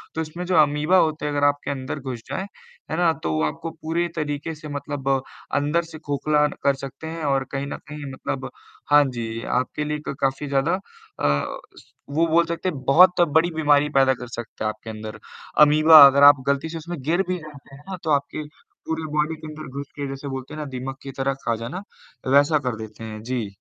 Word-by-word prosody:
तो 160 - -1
उसमें 160 +3 -5
जो 180 - 0
अमीबा 150 +5 +3
होते 155 -3 +1
हैं, 150 - -1
अगर 145 0 0
आपके 145 0 -1
अंदर 135 +1 -4
घुस 130 -4 -6
जाएँ, 190 - -3 0.5
है - - -1
ना? 175 -1 +4
तो 80 - -4
वो 80 0 0
आपको 120 - -3
पूरे 170 +2 0
तरीके 150 +1 -3
से 155 0 -10
मतलब 145 -1 -5 0.5
अंदर 150 +4 +2
से 155 - -8
खोखला 150 0 +1 0.2
कर 140 0 +3
सकते 135 +3 -7
हैं 165 0 -5
और 135 -1 +1
कहीं 135 0 -2
न - - -5
कहीं 150 -2 -7
मतलब 130 0 -4 0.4
हाँ 145 0 +8
जी, 115 -3 -4
आपके 130 +4 -1
लिए 150 0 -2
क - - -2
काफ़ी 135 +2 0
ज़्यादा 140 +4 +1 0.5
अ, - - +2 0.8
वो 160 +4 +2
बोल 165 +1 +4
सकते 170 +2 -2
हैं, 155 - -5
बहुत 180 +5 +6 0.2
बड़ी 170 +2 +3
बीमारी 150 -2 +3
पैदा 135 -1 +5
कर 125 -1 -8
सकते 120 -2 -7
हैं 110 - +1
आपके 110 +1 -8
अंदर 110 -1 -7 0.5
अमीबा, 155 0 +9
अगर 140 +1 +4
आप 145 -2 +8
गलती 140 +3 0
से 165 - -5
उसमें 170 +2 -6
गिर 170 +6 +2
भी 185 0 -1
जाते 145 -3 -13
हैं 140 - -14
ना, 190 - -4
तो 160 - -3
आपके 145 +2 0 0.4
पूरे 160 -1 -3
बॉडी 150 +1 +1
के 155 0 -10
अंदर 155 -1 -8
घुस 140 0 -5
के 145 -1 -4
जैसे 135 +1 -6
बोलते 135 +1 -6
हैं 155 - -6
ना 150 - -4
दीमक 135 +1 -5
की 135 - -6
तरह 135 0 0
खा 115 - +1
जाना, 120 - -6 0.5
वैसा 145 +2 +5
कर 120 - 0
देते 110 +1 -9
हैं। 110 -1 -7
जी। 120 -4 -3
145 Hz, 215 wpm, -23 LUFS, 135-155 Hz, 0.8 s, अमीबा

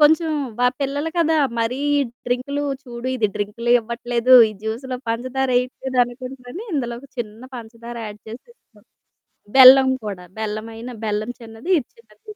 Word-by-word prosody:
కొంచెం 315 +2 +4 0.3
మా 245 - +4
పిల్లలు 285 +3 -1
కదా 325 -1 +3 0.2
మరీ 230 +3 -1 0.2
ఈ - - +3 0.3
డ్రింకులు 255 +4 -1 0.2
చూడు 240 0 -6
ఇది 215 -4 +1
డ్రింకులు 215 +4 -3
ఇవ్వట్లేదు 235 +2 +1
ఈ - - -7
జ్యూస్‌లో 245 +4 -4
పంచదారేయట్లేదు 255 +1 -1
అనుకుంటరని 255 - -9
ఇందులో 240 -4 -2
ఒక 275 - -15
చిన్న 225 0 -6
పంచదార 235 +1 -9
యాడ్ 210 0 -9
చేసి 230 - -10
ఇస్తా. - - -26 0.8
బెల్లం 265 0 +10 0.2
కూడా 190 -4 -6
బెల్లమైన 220 +2 -5 0.2
బెల్లం 215 +2 -2
చిన్నది, 225 +7 -10
ఇది 240 - -10
చిన్నది 215 -2 -23
245 Hz, 140 wpm, -21 LUFS, 225-265 Hz, 0.8 s, బెల్లం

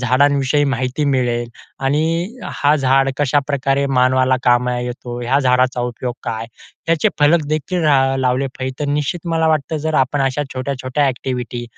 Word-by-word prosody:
झाडांविषयी 140 +3 +2
माहिती 130 +1 -1
मिळेल. 120 -4 0 0.3
आणि 165 - -1
हा 145 +1 +2
झाड 135 -1 +2
कशाप्रकारे 140 -1 +1
मानवाला 130 0 +3
कामा 125 0 +2
येतो, 120 0 -5
ह्या 125 +3 +1
झाडाचा 125 -1 +2
उपयोग 120 0 -4
काय 110 0 -3 0.4
त्याचे 165 -2 +2
फलक 150 +2 +4
देखील 155 +4 -1
ला 135 -3 +3
लावले 130 +1 +1
पाहिजे. 130 0 -3
तर 145 -1 -1
निश्चित 150 +4 -2
मला 160 0 +2
वाटतं 155 0 0
जर 160 - -1
आपण 135 +1 +1
अशा 135 +2 0
छोट्या-छोट्या 130 +1 -2
ॲक्टिव्हिटी 125 -2 -3
135 Hz, 150 wpm, -18 LUFS, 125-145 Hz, 0.4 s, फलक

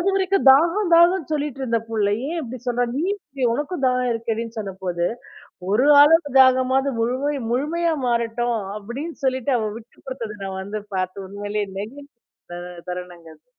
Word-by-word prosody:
அதுவரைக்கும் 390 -1 +1
தாகம் 340 +7 +3
தாகம்ன்னு 340 -1 +4
சொல்லிட்டு 290 -3 -2
இருந்த 235 -3 +1
புள்ளை 205 -2 +1
ஏன் 335 +1 -2
இப்படி 255 0 -7
சொல்றா, 245 0 +1
நீ 300 - 0 0.2
குடி 275 -3 -5
உனக்கும் 295 +4 -3
தாகம் 250 -1 +1
இருக்கேடின்னு 230 0 -4
சொன்ன 200 -3 -5
போது, 175 -1 -1 0.6
ஒரு 240 +7 +3
ஆளுடைய 295 0 +5
தாகமாவது 260 +1 +4
முழமை 260 +5 0 0.2
முழுமையா 320 +7 0
மாறட்டும் 235 0 0 0.2
அப்படின்னு 250 +11 -6
சொல்லிட்டு 260 0 0
அவ 215 -1 -1
விட்டு 230 +1 -19
கொடுத்ததை 230 -5 -6
நான் 190 0 -4
வந்து 205 +2 -5 0.2
பார்த்து 185 +1 -3
உண்மையிலேயே 205 +1 -3
நெகிழ்ந்த 280 +8 -8 0.4
த - - -6 0.3
தருணங்க 180 -2 -7
அது. 155 - -38
250 Hz, 155 wpm, -22 LUFS, 215-290 Hz, 0.6 s, ஆளுடைய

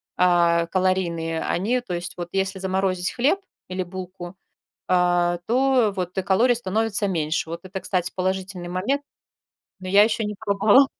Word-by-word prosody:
а, 170 -2 +3
калорийные, 170 -3 0
они, 235 +8 0
то 210 -8 -6
есть 175 +2 -3
вот 175 -1 -6
если 195 0 -1
заморозить 190 -1 0
хлеб 265 +10 +2 0.3
или 185 0 -3
булку, 180 0 -8 0.6
а, 175 -1 +2
то 250 -3 +3
вот 180 0 -4
и 190 - +2
калорий 225 +7 +3
становится 215 -1 0
меньше. 160 -2 -1
Вот 170 +1 -5
это, 190 +1 -6
кстати, 180 -1 -1
положительный 185 -1 -2
момент, 195 +11 -1 0.8
но 185 - -9
я 200 +2 +6
еще 220 0 +1
не 210 0 -3
пробовала. 210 +6 +4
185 Hz, 155 wpm, -23 LUFS, 175-205 Hz, 0.8 s, я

